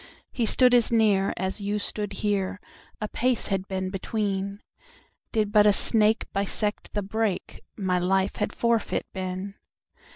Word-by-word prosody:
He 235 -4 -1
stood 250 +1 +4
as 240 -2 +4
near, 210 -4 +3
as 190 +3 -3 0.2
stood 205 -1 -3
you - - -6
here,A 200 +1 -3
pace 250 +1 0
had 195 -1 -1
been 190 -1 -3
between—Did 205 - -4
but 210 -1 +6
a - - +7
snake 220 +1 +3
bisect 205 +1 -1
the 205 - 0
brake, 215 -1 -2 0.2
My 185 -3 0
life 190 +2 +1
had 210 - -1
forfeit 235 -2 0
been. 185 +1 -4
205 Hz, 135 wpm, -26 LUFS, 190-220 Hz, 0.2 s, a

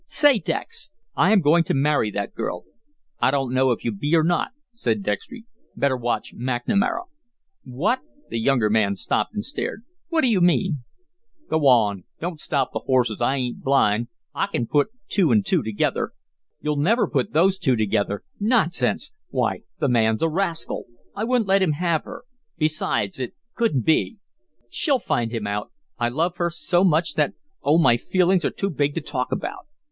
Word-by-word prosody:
"Say, 290 -6 +4
Dex, 165 - -4 0.3
I 180 - +4
am 215 -3 +5
going 165 +3 +4
to - - 0
marry 140 -5 +2
that 100 -1 -4
girl." 90 - -4 0.6
"I - - +3
dunno 130 -1 +1
if 120 - -1
you 115 - +1
be 145 +10 0
or 160 - +4
not," 175 +1 +1 0.3
said 115 - -1
Dextry. 225 - -4 0.3
"Better 140 -2 +1
watch 120 -1 -2
McNamara." 130 - 0 0.6
"What!" 175 - 0 0.3
The 115 - -1
younger 120 -2 +2
man 105 -2 +2
stopped 160 - -1
and 210 - -2
stared. 255 -5 -4 0.3
"What 330 -2 +2
do 260 - +3
you 210 -6 +2
mean?" 175 -3 +2 0.7
"Go 155 -3 +3
on. 105 -7 +3
Don't 170 -1 -4
stop 140 -4 -1
the - - -1
horses. 125 -5 +1
I 125 +3 +2
ain't 125 -3 -3
blind. 120 -4 +2 0.3
I 140 - 0
kin 120 - -2
put 145 +4 +2 0.2
two 190 -5 +2
an' 210 - +4
two 190 -4 +2
together." 110 -3 -1 0.5
"You'll 150 -1 -1
never 225 +9 +3
put 210 - -1
those 190 +4 +3
two 130 -9 +2
together. 100 -2 0 0.2
Nonsense! 210 - +1 0.2
Why, - - 0 0.2
the - - +1
man's 110 0 +2
a 165 - +3
rascal. 170 -1 -1 0.3
I 210 - -2
wouldn't 240 -3 +1
let 195 0 +4
him 175 -5 +2
have 165 0 0
her. - - -9 0.3
Besides, 155 - 0
it 125 -2 -4 0.2
couldn't 220 - 0
be. 160 +8 +2 0.5
She'll 285 - +1
find 120 - -1
him 115 -3 -3
out. 105 0 -3 0.3
I 120 0 +1
love 170 +7 -1
her 175 -1 +1
so 175 +1 +1
much 165 -2 +2
that 150 -2 +1 0.3
oh, 155 - +3
my 140 -8 +5
feelings 185 +5 +2
are - - +2
too 195 - -2
big 145 -1 0
to 165 - -1
talk 130 -3 -3
about." 370 - -4
150 Hz, 180 wpm, -23 LUFS, 120-185 Hz, 0.7 s, am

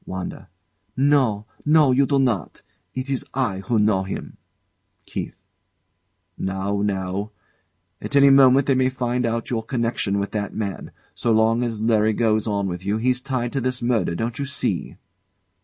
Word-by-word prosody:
WANDA. 95 -1 -6 0.5
No, 130 -7 +2 0.2
no, 150 -2 +5
you 135 +2 +3
do 140 - +2
not. 115 - -1 0.3
It 130 +1 -3
is 135 -2 -1
I 120 -8 0
who 105 +4 -1
know 105 -2 +3
him. 95 - -6 0.7
KEITH. - - -5 1.0
Now, 95 +1 -2
now! 100 0 -2 0.7
At - - -5
any 140 0 +7
moment 135 0 +6
they 140 - +3
may 130 0 +2
find 125 -1 -1
out 115 +1 -3
your 115 -2 0
connection 115 -4 -1
with 100 0 -2
that 105 -1 -3
man. 100 -6 -4 0.2
So 120 - -1
long 110 +1 +3
as 115 -3 -2
Larry 110 -1 +3
goes 110 -1 +1
on 100 -2 0
with 90 0 -5
you, 100 +2 0
he's 125 +2 0
tied 125 -3 -3
to 135 - -1
this 125 0 -2
murder, 120 -8 +1
don't 115 +6 -3
you 140 - -1
see? 140 +1 -2
115 Hz, 165 wpm, -22 LUFS, 100-130 Hz, 1.0 s, any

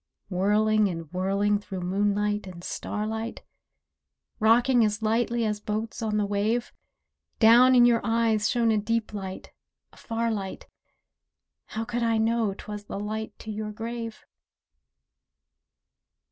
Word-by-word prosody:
Whirling 210 +3 +2
and 165 -3 -6
whirling 200 +3 +1
through 195 -3 -6
moonlight 205 +2 0
and 175 -2 -10
starlight. 220 +4 -4 1.0
Rocking 240 +2 +4
as 210 0 0
lightly 235 +1 +1
as 210 -1 -1
boats 215 +3 -4
on 215 -2 0
the 210 - +1
wave, 210 +4 -1 0.6
Down 245 +3 +7
in 240 -1 +7
your 235 -1 +4
eyes 225 -2 +2
shone 235 -2 +2
a 215 - +2
deep 225 +1 -1
light—a 190 -2 -10
far 230 0 -2
light, 195 -3 -5 1.0
How 225 +1 -4
could 240 0 -3
I 230 -1 +2
know 220 -2 +1
'twas 210 0 -8
the 200 - -5
light 215 +1 -5
to 220 - -7
your 210 0 -4
grave? 230 +1 -6
215 Hz, 130 wpm, -26 LUFS, 205-230 Hz, 1.0 s, Down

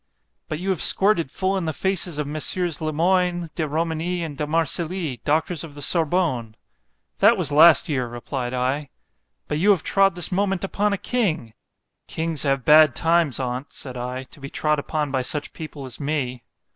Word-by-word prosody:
——But 155 - -4
you 185 +4 -4
have 185 -4 0
squirted 190 -7 +5
full 190 +7 -1
in 185 - -3
the 160 - -2
faces 185 -2 -1
of 150 - -2
Mess. 150 +1 -1
Le 160 -3 -2
Moyne, 175 +1 0
De 155 - -2
Romigny, 165 +3 -2
and 155 -3 -6
De 150 +1 -3
Marcilly, 165 - -1
doctors 160 +2 0
of 155 -3 -10
the 145 - -9
Sorbonne.——That 165 - 0
was 165 -6 -1
last 160 +2 +6
year, 130 -5 -1
replied 120 +1 -5
I.—But 135 +3 -5
you 195 +5 +3
have 195 -5 +3
trod 195 -2 +2
this 175 0 0
moment 195 0 0
upon 205 +2 0
a 200 - 0
king.——Kings 165 - -4
have 135 -3 0
bad 150 -3 +6
times 165 -5 +2
on't, 125 +1 -4
said 130 -2 -7
I, 125 +1 -5
to 135 - -17
be 140 0 -8
trod 150 0 0
upon 150 -1 -3
by 130 -1 0
such 145 +3 -2
people 150 -3 -8
as 130 - -9
me. 135 -4 -3
155 Hz, 175 wpm, -22 LUFS, 140-175 Hz, -, last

